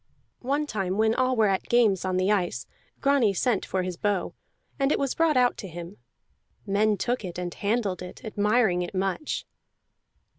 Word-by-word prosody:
One 285 +4 -1
time 195 -7 -2
when 220 0 +3
all 255 +1 +1
were 220 -2 +4
at 195 -2 0
games 220 -6 +3
on 185 -1 0
the 185 +2 +2
ice, 175 - 0 0.4
Grani 275 -8 +3
sent 230 0 0
for 185 -1 -1
his 180 -1 -4
bow, 205 -3 -1 0.5
and 275 +1 +2
it - - +2
was 275 -2 -1
brought 320 -4 +2
out 250 -1 +3
to 195 - -6
him. 175 +2 -8 0.7
Men 205 +1 +2
took 245 +4 -1
it 180 -2 -6
and 175 -1 -4
handled 205 -3 -1
it, 180 +4 -9
admiring 210 -3 +2
it 175 +2 -5
much. 195 +10 -2
205 Hz, 180 wpm, -26 LUFS, 185-245 Hz, 0.7 s, were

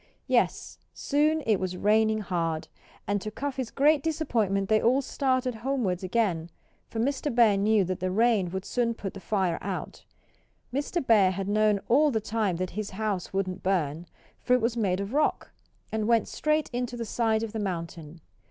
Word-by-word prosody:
Yes, - - 0 0.2
soon 305 +2 +1
it 215 -3 +3
was 185 -1 -3
raining 215 +2 +2
hard. 165 -4 -2 0.4
And 205 0 -1
to 215 - -4
Cuffy's 265 +1 -4
great 295 +1 +3
disappointment 230 - 0
they 215 +1 +3
all 255 +4 +3
started 255 -2 0
homewards 225 -6 -1
again, 185 -4 0 0.4
for 225 - -5
Mr. 280 +5 0
Bear 230 -4 +5
knew 205 +1 +3
that 185 +1 -3
the 185 +1 -1
rain 215 -2 +2
would 190 +2 -5
soon 235 -2 0
put 195 -4 -6
the 195 - -8
fire 190 -3 0
out. - - -5 0.7
Mr. 285 +3 -2
Bear 210 -6 +5
had 190 +1 -3
known 210 -1 +2
all 295 +5 +4
the 225 -5 0
time 215 -3 -1
that 185 +1 -3
his 210 +1 -4
house 200 -2 -3
wouldn't 190 -1 -2
burn; 170 -3 -1 0.3
for 250 - +1
it 250 - +1
was 230 +1 0
made 195 -5 0
of 200 +4 -4
rock, 300 +1 0 0.4
and 220 -1 -1
went 230 -2 +3
straight 305 0 0
into 245 0 -3
the 230 - -3
side 225 -1 0
of 225 - -4
the 220 - -3
mountain. 170 -4 -5
215 Hz, 180 wpm, -27 LUFS, 190-245 Hz, 0.7 s, Bear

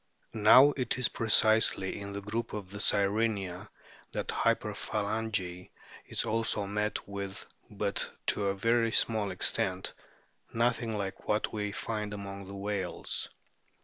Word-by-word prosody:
Now 120 +6 +7
it 125 -3 -1
is 125 - +2
precisely 110 -4 +3
in 100 0 -6
the 100 0 -5
group 110 +3 -3
of 100 -3 -6
the 100 - -7
Sirenia 100 -3 +1 0.4
that - - -3
hyperphalangy 105 -4 -1 0.4
is - - -1
also 110 -2 0
met 105 +1 -2
with, 100 0 -6 0.2
but 100 -1 -1 0.2
to 100 - +1
a 100 - 0
very 115 +3 +2
small 110 -3 +2
extent 95 0 -1 0.6
nothing 115 -1 0
like 95 -1 -5
what 105 +1 0
we 105 -1 -2
find 105 0 -3
among 100 -1 -7
the 100 - -8
whales. 100 -2 -2
105 Hz, 130 wpm, -30 LUFS, 100-110 Hz, 0.6 s, Now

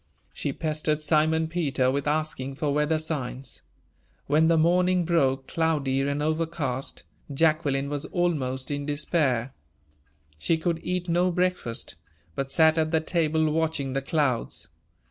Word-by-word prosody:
She 145 - -3
pestered 155 0 -1
Simon 160 +1 +2
Peter 145 -6 0
with 140 +1 -2
asking 150 -3 -2
for 145 0 -1
weather 150 +2 +2
signs. 135 -5 -5 0.6
When 155 +3 +3
the 165 0 +4
morning 180 +2 +3
broke, 135 -6 +1
cloudy 150 -5 0
and 140 +1 -1
overcast, 155 -4 -2 0.3
Jacqueline 145 -2 +1
was 145 0 -3
almost 145 -8 -1
in 145 0 -3
despair; 145 -5 0 0.9
she 165 - +1
could 165 0 -1
eat 180 0 -2
no 175 +2 +2
breakfast, 175 - -2 0.4
but 135 +6 -3
sat 160 +1 +4
at 155 0 +1
the 160 0 +2
table 160 -1 +1
watching 155 -4 -1
the 135 - 0
clouds. 135 -5 -1
155 Hz, 135 wpm, -26 LUFS, 135-165 Hz, 0.9 s, the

